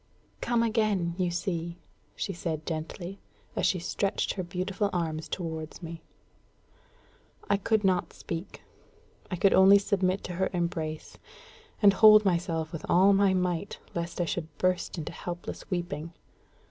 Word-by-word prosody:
"Come 235 Hz, -1 st, +2 dB
again, 215 Hz, -6 st, +1 dB
you 180 Hz, -1 st, +2 dB
see!" 170 Hz, -1 st, -3 dB, 0.4 s
she 195 Hz, -, -3 dB
said 160 Hz, -3 st, -4 dB
gently, 170 Hz, +4 st, -5 dB, 0.4 s
as -, -, +2 dB
she 185 Hz, -, +2 dB
stretched 195 Hz, +3 st, -1 dB
her 190 Hz, -, -3 dB
beautiful 185 Hz, +3 st, -2 dB
arms 160 Hz, -3 st, -2 dB
towards 160 Hz, -1 st, -5 dB
me. 165 Hz, 0 st, -7 dB, 1.5 s
I 200 Hz, -, +3 dB
could 215 Hz, +2 st, +1 dB
not 185 Hz, -2 st, +1 dB
speak. 170 Hz, +2 st, -7 dB, 0.7 s
I 185 Hz, -, -2 dB
could 190 Hz, +2 st, +4 dB
only 195 Hz, +1 st, +8 dB
submit 190 Hz, -1 st, 0 dB
to 180 Hz, -, -5 dB
her 190 Hz, +2 st, 0 dB
embrace, 165 Hz, -3 st, -3 dB, 0.6 s
and 200 Hz, -1 st, +8 dB
hold 215 Hz, +1 st, +8 dB
myself 170 Hz, -3 st, 0 dB
with 165 Hz, -, -5 dB
all 190 Hz, +3 st, +6 dB
my 195 Hz, -1 st, +4 dB
might, 180 Hz, +1 st, -1 dB, 0.2 s
lest 170 Hz, +1 st, -4 dB
I 175 Hz, -, +2 dB
should 165 Hz, 0 st, -3 dB
burst 185 Hz, 0 st, 0 dB
into 155 Hz, -, -4 dB
helpless 175 Hz, 0 st, -7 dB
weeping. 170 Hz, -3 st, -3 dB
180 Hz, 145 wpm, -28 LUFS, 170-195 Hz, 1.5 s, only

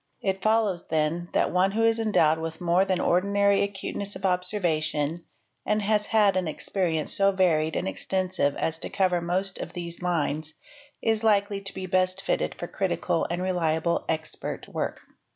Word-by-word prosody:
It 190 Hz, -1 st, -1 dB
follows, 215 Hz, -5 st, +1 dB
then, 160 Hz, +2 st, -1 dB
that -, -, +2 dB
one 185 Hz, +2 st, +2 dB
who 225 Hz, +1 st, +1 dB
is 225 Hz, 0 st, +3 dB
endowed 160 Hz, -8 st, +3 dB
with 160 Hz, 0 st, -5 dB
more 175 Hz, +2 st, +3 dB
than 185 Hz, -2 st, 0 dB
ordinary 200 Hz, +2 st, +2 dB
acuteness 200 Hz, 0 st, -3 dB
of 190 Hz, +1 st, -5 dB
observation, 170 Hz, -4 st, -1 dB, 0.4 s
and 210 Hz, 0 st, +1 dB
bas 210 Hz, 0 st, +1 dB
had 210 Hz, -3 st, +4 dB
an 185 Hz, -2 st, 0 dB
experience 160 Hz, 0 st, 0 dB
so 195 Hz, 0 st, +4 dB
varied 160 Hz, -5 st, +2 dB
¢ 180 Hz, -, -1 dB
extensive 185 Hz, -7 st, -1 dB
as 165 Hz, 0 st, -1 dB
to -, -, -4 dB
cover 185 Hz, -3 st, +1 dB
most 185 Hz, +3 st, -1 dB
of -, -, -6 dB
these 170 Hz, -1 st, -6 dB
lines, 155 Hz, -3 st, -1 dB, 0.5 s
is 225 Hz, -1 st, +1 dB
likely 200 Hz, -2 st, +2 dB
to 195 Hz, 0 st, -6 dB
be 190 Hz, -, -4 dB
best 185 Hz, +1 st, +1 dB
fitted -, -, -1 dB
1 -, -, -10 dB
0 -, -, -5 dB
critical -, -, 0 dB
and 175 Hz, +1 st, -2 dB
reliable 170 Hz, -2 st, 0 dB
expert 155 Hz, -1 st, -4 dB
work. -, -, -4 dB
185 Hz, 170 wpm, -26 LUFS, 165-200 Hz, 0.5 s, had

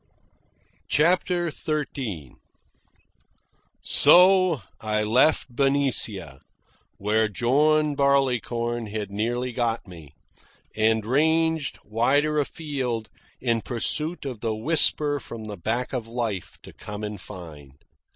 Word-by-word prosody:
CHAPTER 175 Hz, +2 st, +1 dB
XIII 130 Hz, -, -4 dB, 1.5 s
So 180 Hz, -, +5 dB, 0.2 s
I 105 Hz, -1 st, -1 dB
left 125 Hz, +3 st, +2 dB
Benicia, 125 Hz, -, 0 dB, 0.6 s
where 110 Hz, +2 st, +1 dB
John 145 Hz, +8 st, +2 dB
Barleycorn 120 Hz, -4 st, 0 dB
had 105 Hz, -1 st, -5 dB
nearly 120 Hz, +5 st, -2 dB
got 115 Hz, -2 st, -2 dB
me, 80 Hz, -5 st, -13 dB, 0.6 s
and 110 Hz, 0 st, +2 dB
ranged 160 Hz, +4 st, +1 dB
wider 140 Hz, +8 st, +1 dB
afield 135 Hz, -7 st, -3 dB, 0.3 s
in 115 Hz, -3 st, 0 dB
pursuit 145 Hz, -, 0 dB
of 125 Hz, -5 st, -5 dB
the 110 Hz, -1 st, -2 dB
whisper 145 Hz, +3 st, +2 dB
from 115 Hz, -3 st, -9 dB
the 105 Hz, -1 st, -6 dB
back 115 Hz, +8 st, -2 dB
of 120 Hz, -3 st, -3 dB
life 115 Hz, -6 st, -4 dB
to -, -, -12 dB
come 105 Hz, 0 st, -8 dB
and 105 Hz, -2 st, -5 dB
find. 75 Hz, -9 st, -11 dB
120 Hz, 100 wpm, -24 LUFS, 105-145 Hz, 1.5 s, So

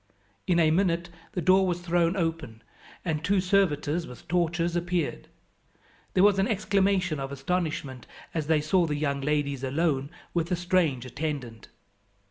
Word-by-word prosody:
In 175 Hz, -, +3 dB
a 160 Hz, -2 st, +4 dB
minute 175 Hz, -1 st, +1 dB, 0.2 s
the 180 Hz, -4 st, -2 dB
door 190 Hz, 0 st, +5 dB
was 175 Hz, -1 st, -1 dB
thrown 175 Hz, +1 st, +1 dB
open, 160 Hz, -10 st, -3 dB, 0.4 s
and 155 Hz, -3 st, -1 dB
two 195 Hz, +3 st, +2 dB
servitors 175 Hz, -4 st, +1 dB
with 125 Hz, -, -12 dB
torches 170 Hz, 0 st, 0 dB
appeared. 175 Hz, -2 st, -2 dB, 0.9 s
There 185 Hz, -, +5 dB
was 200 Hz, -1 st, +5 dB
an 195 Hz, -, +2 dB
exclamation 195 Hz, -, +1 dB
of 135 Hz, 0 st, -4 dB
astonishment 140 Hz, -3 st, -3 dB, 0.3 s
as 155 Hz, -3 st, -2 dB
they 155 Hz, -1 st, +3 dB
saw 170 Hz, +3 st, +2 dB
the 150 Hz, -, -1 dB
young 140 Hz, -2 st, -1 dB
ladies 140 Hz, -2 st, -1 dB
alone 140 Hz, 0 st, 0 dB, 0.2 s
with 170 Hz, +1 st, -1 dB
a -, -, +3 dB
strange 170 Hz, -8 st, +1 dB
attendant. 130 Hz, -4 st, -5 dB
165 Hz, 150 wpm, -27 LUFS, 145-180 Hz, 0.9 s, door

